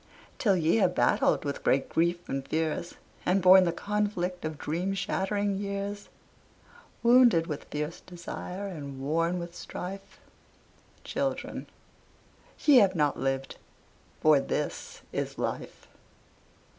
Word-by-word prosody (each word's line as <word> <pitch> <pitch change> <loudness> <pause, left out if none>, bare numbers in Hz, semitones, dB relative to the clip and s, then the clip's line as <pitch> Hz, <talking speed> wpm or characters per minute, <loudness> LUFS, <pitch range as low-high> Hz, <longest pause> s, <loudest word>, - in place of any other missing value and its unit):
Till 200 -5 +3
ye 165 +4 +2
have 190 -5 +2
battled - - +2
with 140 - -4
great 135 0 +2
grief 170 +1 0
and 135 0 -3
fears, 160 +2 -2 0.3
And 185 +2 +2
borne 185 0 +7
the 170 - +1
conflict 200 -1 -2
of 155 -1 -4
dream 175 +7 -2
shattering 195 +1 -1
years, 200 0 -4 0.9
Wounded 235 -8 +6
with 150 -4 -5
fierce 150 +2 -4
desire 180 +2 -7
and 145 -8 -7
worn 165 +5 0
with 170 -1 -6
strife, 195 +3 -8 0.8
Children, - - -3 1.0
ye 290 -3 +8
have 195 -5 +5
not 150 -3 +1
lived: 135 +1 -2 0.6
for 155 -2 +6
this - - -4
is - - -3
life. - - -4
180 Hz, 120 wpm, -28 LUFS, 155-195 Hz, 1.0 s, ye